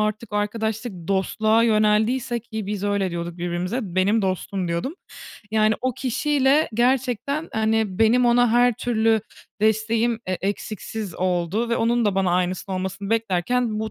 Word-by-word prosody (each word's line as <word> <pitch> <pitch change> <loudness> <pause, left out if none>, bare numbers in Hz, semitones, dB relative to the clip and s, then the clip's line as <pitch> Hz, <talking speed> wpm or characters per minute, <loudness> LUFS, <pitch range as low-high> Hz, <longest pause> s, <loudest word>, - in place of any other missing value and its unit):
artık 215 +1 -2
arkadaşlık 220 +2 -2 0.2
dostluğa 215 +3 +2
yöneldiyse 220 +3 +2
Ki 220 -2 -6
biz 205 -1 -3
öyle 200 -2 0
diyorduk 170 0 -5
birbirimize. 175 +6 -2
"Benim 195 +3 +1
dostum" 185 0 -2
diyordum. 170 - -2 0.6
Yani, 215 0 +3
o 255 0 0
kişiyle 275 +3 +2
gerçekten, 255 +5 0
hani, 220 -3 0
benim 240 +3 +4
ona 240 0 +4
her 245 +1 +4
türlü 225 -2 +1 0.4
desteğim 220 +2 +1
e 185 - -1
eksiksiz 205 0 -4
oldu 185 +5 -1
ve 235 - +1
onun 235 +1 +1
da 205 -2 +1
bana 190 -2 +1
aynısını 180 +2 -1
olmasını 190 +2 -4
beklerken 225 +2 0
bu 220 0 -3
220 Hz, 140 wpm, -23 LUFS, 195-235 Hz, 0.6 s, benim